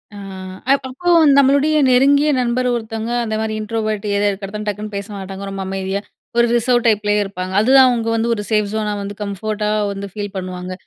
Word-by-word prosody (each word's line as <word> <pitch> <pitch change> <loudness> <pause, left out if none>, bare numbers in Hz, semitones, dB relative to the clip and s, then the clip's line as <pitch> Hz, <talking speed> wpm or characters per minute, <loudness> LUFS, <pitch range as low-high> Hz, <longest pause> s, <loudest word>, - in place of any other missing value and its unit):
ஆ, - - -9 0.5
அ - - +8 0.2
அப்போ 350 +8 -3 0.3
நம்மளுடைய 280 +3 +4
நெருங்கிய 280 +4 +4
நண்பர் 250 +1 0
ஒருத்தவங்க 225 0 -4
அந்த 220 -1 -2
மாரி 220 0 -2
இன்ட்ரோவர்ட் 215 -1 -3
ஏதோ 200 +1 +1
இருக்கிறத 195 +1 -6
டக்குனு 210 +1 -4
பேச 200 +1 -4
மாட்டாங்க. 195 0 -7
ரொம்ப 195 0 -5
அமைதியா 195 +1 -3 0.4
ஒரு 235 - +5
ரிசர்வ் 240 0 +2
டைப்லயே 210 -1 +2
இருப்பாங்க. 185 -1 -6
அதுதான் 260 +3 +6
அவுங்க 230 -2 -1
வந்து 230 +1 0
ஒரு 205 - -4
சேஃப் 210 -2 +1
ஜோனா 215 -1 -1
வந்து 200 0 -6
கம்ஃபோர்ட்டா 210 +1 -3 0.2
வந்து 200 0 -6
ஃபீல் 205 -1 -5
பண்ணுவாங்க. 185 -1 -5
215 Hz, 175 wpm, -18 LUFS, 200-235 Hz, 0.5 s, அ